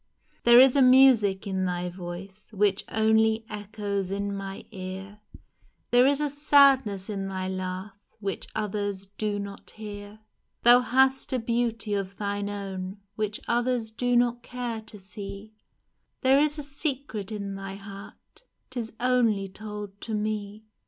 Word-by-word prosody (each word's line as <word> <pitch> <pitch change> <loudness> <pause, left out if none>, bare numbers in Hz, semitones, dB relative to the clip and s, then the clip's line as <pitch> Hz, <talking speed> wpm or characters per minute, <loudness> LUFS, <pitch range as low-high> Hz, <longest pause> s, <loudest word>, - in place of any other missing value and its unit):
There 240 0 +9
is 260 0 +7
a 280 - +5
music 255 -7 +6
in 190 -1 -1
thy 180 0 -2
voice 185 +4 -9
Which 205 -1 +2
only 220 0 +3
echoes 205 -2 -4
in 200 +1 -2
my 195 0 -6
ear, 190 +1 -7 0.7
There 245 +2 +6
is 280 0 +2
a 300 - +1
sadness 275 -8 +4
in 195 -3 -3
thy 190 -1 -3
laugh 185 +1 -4 0.3
Which 200 -2 -4
others 205 -2 -2
do 205 +1 -3
not 200 0 -7
hear! 205 -1 -9 0.5
Thou 240 +1 +8
hast 265 +2 +2
a - - +2
beauty 230 -2 -1
of 195 -1 -2
thine 205 0 -2
own 195 -1 -5 0.2
Which 215 0 -2
others 240 -1 0
do 245 +2 0
not 240 0 +2
care 240 -2 -5
to 220 -1 -10
see 200 +2 -9 0.3
— - - -49
There 265 +1 +5
is 300 +1 +2
a 295 - -4
secret 275 - -3
in 200 -2 -4
thy 195 0 -6
heart, 200 - -12 0.3
'Tis 235 -4 -5
only 240 -5 +2
told 205 0 -8
to 220 - -3
me 210 0 -3
210 Hz, 150 wpm, -27 LUFS, 195-240 Hz, 0.7 s, There